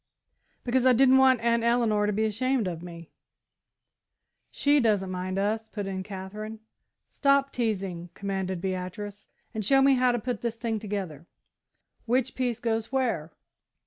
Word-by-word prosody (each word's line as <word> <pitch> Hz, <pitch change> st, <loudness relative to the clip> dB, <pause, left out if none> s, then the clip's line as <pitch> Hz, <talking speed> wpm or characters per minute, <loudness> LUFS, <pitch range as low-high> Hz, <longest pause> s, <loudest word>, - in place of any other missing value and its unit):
"Because 255 Hz, +1 st, +2 dB
I 255 Hz, -, +7 dB
didn't 265 Hz, +2 st, +6 dB
want 260 Hz, -3 st, +5 dB
Aunt 235 Hz, 0 st, +2 dB
Eleanor 230 Hz, -3 st, +2 dB
to -, -, +1 dB
be 215 Hz, +2 st, 0 dB
ashamed 230 Hz, +1 st, 0 dB
of 170 Hz, -2 st, -4 dB
me." 170 Hz, -2 st, -10 dB, 1.4 s
"She 290 Hz, 0 st, +2 dB
doesn't 205 Hz, -6 st, +1 dB
mind 185 Hz, +1 st, -3 dB
us," 215 Hz, +3 st, -1 dB
put 205 Hz, -3 st, -5 dB
in 190 Hz, -1 st, -3 dB
Katherine. 210 Hz, +3 st, -7 dB, 0.5 s
"Stop 275 Hz, -1 st, +2 dB
teasing," 195 Hz, -7 st, -2 dB
commanded 190 Hz, -2 st, -3 dB
Beatrice, 190 Hz, +2 st, -5 dB, 0.3 s
"and 220 Hz, -2 st, -3 dB
show 270 Hz, +7 st, +4 dB
me 270 Hz, 0 st, +5 dB
how 255 Hz, -1 st, +3 dB
to 240 Hz, -, 0 dB
put 240 Hz, -2 st, -3 dB
the 235 Hz, -, 0 dB
thing 230 Hz, -1 st, -3 dB
together. 190 Hz, -7 st, -5 dB, 0.8 s
Which 255 Hz, +2 st, +1 dB
piece 245 Hz, -3 st, -1 dB
goes 225 Hz, -1 st, -2 dB
where?" 230 Hz, -, -1 dB
220 Hz, 150 wpm, -27 LUFS, 190-245 Hz, 1.4 s, I